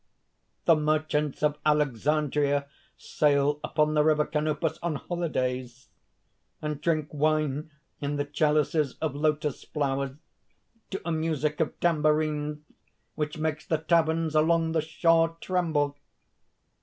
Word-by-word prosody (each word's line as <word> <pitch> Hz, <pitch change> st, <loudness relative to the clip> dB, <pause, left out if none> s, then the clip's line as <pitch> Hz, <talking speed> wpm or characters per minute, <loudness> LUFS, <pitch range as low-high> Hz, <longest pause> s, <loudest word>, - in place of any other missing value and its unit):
"The 165 Hz, -, +6 dB
merchants 150 Hz, -1 st, 0 dB
of 150 Hz, 0 st, +1 dB
Alexandria 145 Hz, 0 st, +1 dB, 0.3 s
sail 145 Hz, 0 st, +1 dB
upon 150 Hz, 0 st, +1 dB
the 150 Hz, -1 st, +4 dB
river 150 Hz, -1 st, +3 dB
Canopus 155 Hz, +1 st, -1 dB
on 170 Hz, -2 st, -1 dB
holidays, 130 Hz, -8 st, -3 dB, 0.7 s
and 150 Hz, -1 st, -4 dB
drink 155 Hz, -2 st, 0 dB
wine 155 Hz, 0 st, 0 dB, 0.3 s
in 145 Hz, 0 st, -2 dB
the 145 Hz, 0 st, -1 dB
chalices 150 Hz, -1 st, +1 dB
of 160 Hz, -3 st, -2 dB
lotus 150 Hz, 0 st, -1 dB
flowers, 140 Hz, -2 st, -2 dB, 0.7 s
to 195 Hz, -, -4 dB
a 170 Hz, -, -1 dB
music 155 Hz, -2 st, -1 dB
of 160 Hz, -, -1 dB
tambourines 150 Hz, -2 st, +1 dB, 0.5 s
which 150 Hz, 0 st, -3 dB
makes 155 Hz, -1 st, -2 dB
the 160 Hz, -, 0 dB
taverns 160 Hz, 0 st, +1 dB
along 160 Hz, +1 st, +3 dB
the 160 Hz, -1 st, +1 dB
shore 165 Hz, +1 st, +2 dB
tremble! 160 Hz, -6 st, 0 dB
150 Hz, 120 wpm, -27 LUFS, 145-160 Hz, 0.7 s, The